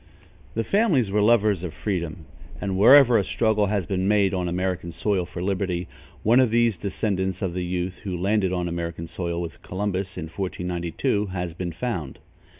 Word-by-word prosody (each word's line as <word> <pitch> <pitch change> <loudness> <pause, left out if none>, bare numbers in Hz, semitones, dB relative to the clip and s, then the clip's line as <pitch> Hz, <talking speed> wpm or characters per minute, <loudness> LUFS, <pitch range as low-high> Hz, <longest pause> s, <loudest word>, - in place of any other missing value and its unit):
The 115 - 0
family 200 - +3
were 105 +1 +2
lovers 105 -4 +3
of 90 - -5
freedom, 85 -5 -3 0.3
and, 95 0 -2
wherever 120 +3 +7
a - - +1
struggle 110 0 +1
has 100 -2 0
been 95 +2 -1
made 100 -2 +3
on 90 -2 -1
American 90 -1 -2
soil 95 +1 -1
for 90 0 -6
liberty, 90 -2 -1 0.4
one 115 +4 +5
of 130 -3 +4
these 115 -1 +3
descendants 95 0 -2
of 90 -3 -1
the 90 0 -2
youth 90 +1 -3
who 95 -4 -4
landed 95 +1 +1
on 90 -1 -1
American 85 -1 -4
soil 85 0 -3
with 85 -1 -6
Columbus, 95 0 -3
in 90 - -3
1492, 90 +3 -2
has 90 -3 -4
been 90 0 -4
found. 85 - -4
95 Hz, 175 wpm, -24 LUFS, 90-105 Hz, 0.4 s, wherever